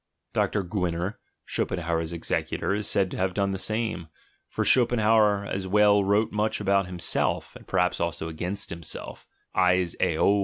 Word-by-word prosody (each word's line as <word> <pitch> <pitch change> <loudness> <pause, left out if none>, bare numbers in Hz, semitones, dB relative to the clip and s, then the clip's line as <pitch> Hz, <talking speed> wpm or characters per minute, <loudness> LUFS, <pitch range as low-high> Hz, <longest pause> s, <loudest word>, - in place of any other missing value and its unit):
Dr. 105 - +1
G 95 +3 -4
winner, 90 +3 -2 0.3
Schopen - - -2
hauer's 85 -1 -2
executor, 85 +3 -2
is 105 +1 -2
said 95 -2 +1
to - - -5
have 95 0 -1
done 100 -1 +1
the 95 - -3
same; 110 -5 -2 0.4
for - - -2
Schopenhauer 110 -4 +4
as 95 -1 -3
well 105 +1 +4
wrote 100 +3 +2
much 105 +1 0
about 100 -2 +2
himself, 90 -1 -1
and - - -13
perhaps 90 0 +1
also 85 -1 -2
against 90 +5 -4
himself 85 -2 -6 0.3
(sis 90 -1 +2
eauxov). 100 +1 +3
95 Hz, 160 wpm, -26 LUFS, 90-105 Hz, 0.4 s, Schopenhauer